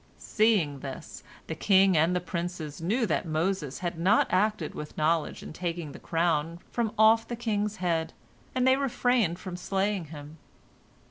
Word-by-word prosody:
Seeing 205 -11 +1
this, 135 +4 -8 0.2
the - - -4
king 190 +2 +4
and 165 +3 +3
the - - +2
princes 170 -3 -5
knew 225 +9 +1
that 170 - 0
Moses 160 -2 -1
had 170 -1 -3
not 195 +6 +4
acted 190 -3 +1
with 150 - -8
knowledge 160 +1 0
in - - -8
taking 170 -3 -4
the - - -10
crown 165 -1 0
from 235 -3 -1
off 220 +1 +5
the 240 - -4
king's 210 -3 -1
head, 170 -4 -1 0.4
and 255 0 +2
they 260 0 +5
refrained 245 -8 +1
from 185 -1 -7
slaying 195 0 -1
him. 150 0 -11
180 Hz, 160 wpm, -28 LUFS, 160-210 Hz, 0.4 s, off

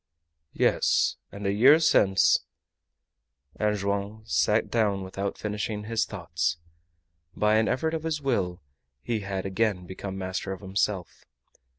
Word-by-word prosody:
"Yes; - - +2
and 100 0 -7
a 100 - +2
year 130 +10 +6
since 95 -11 +4 0.6
" 70 0 -45
And 105 -1 +1
Joam 100 +2 -3
sat 105 +6 +1
down 105 -4 +1
without 95 +1 -4
finishing 105 0 -3
his 115 +1 0
thoughts. 85 -3 -2 0.8
By 105 +1 +3
an 110 - +2
effort 160 +6 0
of 160 - -2
his 160 -1 -2
will 100 - -1 0.4
he 115 -2 -1
had 100 -1 -4
again 95 -2 0
become 95 +1 -6
master 95 +1 -3
of 95 - -9
himself. 95 -1 -2
100 Hz, 140 wpm, -27 LUFS, 95-110 Hz, 0.8 s, year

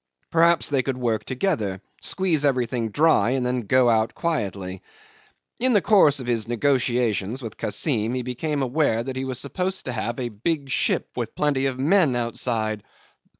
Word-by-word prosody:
Perhaps 170 0 +4
they 140 -2 +2
could 130 0 -3
work 115 -4 -1
together 125 - -1 0.2
squeeze 175 -6 0
everything 125 -4 0
dry 145 -3 +3
and 125 - -1
then 125 0 0
go 125 +4 +3
out 110 -1 +2
quietly. 100 - -3 0.8
In 255 +1 +2
the 205 - +4
course 155 -10 +5
of 130 - -6
his 115 -3 -1
negotiations 120 -2 0
with 110 -2 -6
Kassim 110 +1 -1
he 125 - -2
became 140 +4 -2
aware 130 -3 +1
that 130 +1 -5
he 130 +1 -3
was 130 -1 -3
supposed 185 +7 -3
to 130 - -3
have 120 +1 -3
a 120 -2 -2
big 140 +6 -3
ship - - +1
with - - -4
plenty 140 -2 +1
of 130 -2 -3
men 150 0 +3
outside. 115 -2 -1
125 Hz, 170 wpm, -24 LUFS, 115-145 Hz, 0.8 s, course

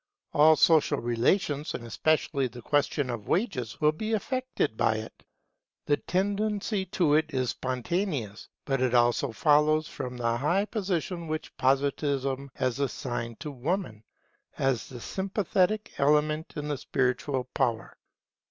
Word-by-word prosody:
All 155 +2 +7
social 160 -1 +4
relations, 140 - 0
and 120 - -6
especially 140 +2 +1
the 120 -1 -11
question 145 -2 +1
of 115 -4 -6
wages, 150 - -1
will 150 0 +4
be 215 +8 -3
affected 255 - -1
by 110 - +2
it. 110 0 -8 0.6
The 145 - +2
tendency 205 +1 -1
to 160 -5 +2
it 155 +1 +2
is 130 -2 +1
spontaneous; 130 - -3 0.2
but 135 -2 0
it 125 -1 +2
also 120 +2 +3
follows 155 +3 +3
from 125 -3 -6
the 115 -1 0
high 170 +10 +1
position 180 -5 -2
which 155 0 -4
Positivism 140 0 0
has 130 0 -1
assigned 120 -4 -3
to 150 - -5
Woman 140 - -3 0.5
as 130 -5 0
the 125 - -8
sympathetic 195 - 0
element 150 +2 +2
in 150 -1 -4
the 145 -3 -2
spiritual 130 0 0
power. 115 -6 -1
145 Hz, 135 wpm, -28 LUFS, 125-170 Hz, 0.6 s, All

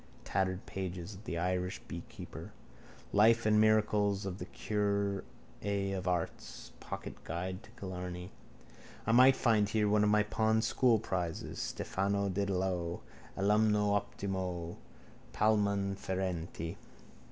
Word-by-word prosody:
Tattered 95 -1 -1
pages. 95 0 -5
The 85 - -3
Irish 90 +3 -1
Beekeeper. 85 - -8 0.6
Life 115 +2 +5
and 105 0 +5
Miracles 105 -2 +3
of 95 0 -4
the - - -6
Curé 100 -2 -1 0.7
of 95 -1 -4
Ars. 90 -2 -3
Pocket - - -7
Guide 90 +4 -4
to - - -16
Killarney. 90 -1 -5 0.7
I 115 - +2
might 130 +3 +7
find 110 -5 +3
here 105 -1 +2
one 105 0 +4
of 105 - +4
my 105 0 +4
pawned 110 +1 +2
schoolprizes. 95 -11 +1
_Stephano 100 0 -1
Dedalo, 95 -3 -1 0.4
alumno 105 +1 +3
optimo, 95 -4 -2 0.6
palmam 100 -2 +2
ferenti. 90 -2 -3
100 Hz, 110 wpm, -33 LUFS, 90-105 Hz, 0.7 s, might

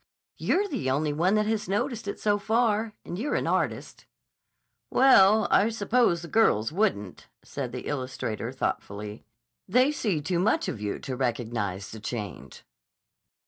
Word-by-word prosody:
"You're 405 +2 +1
the 140 - -2
only 145 +3 0
one 175 +7 +2
that 215 0 +2
has 215 -1 -2
noticed 230 +2 -2
it 200 - -4
so 205 -1 +1
far, 220 0 +1
and 175 - -5
you're 285 +6 -1
an - - 0
artist." - - -2 0.8
"Well, 220 -5 +6
I 210 - +4
suppose 220 -5 +1
the - - -7
girls 130 - +2
wouldn't," 155 - -1 0.2
said - - -5
the - - -6
illustrator 130 -4 -3
thoughtfully. 105 -5 -4 0.4
"They 255 +8 +4
see 210 - -1
too 170 +4 -1
much 190 - +1
of 105 - -4
you 105 -1 -2
to 130 - -5
recognize 115 -6 -2
the 110 - -8
change." 105 -5 -7
180 Hz, 150 wpm, -27 LUFS, -, 0.8 s, Well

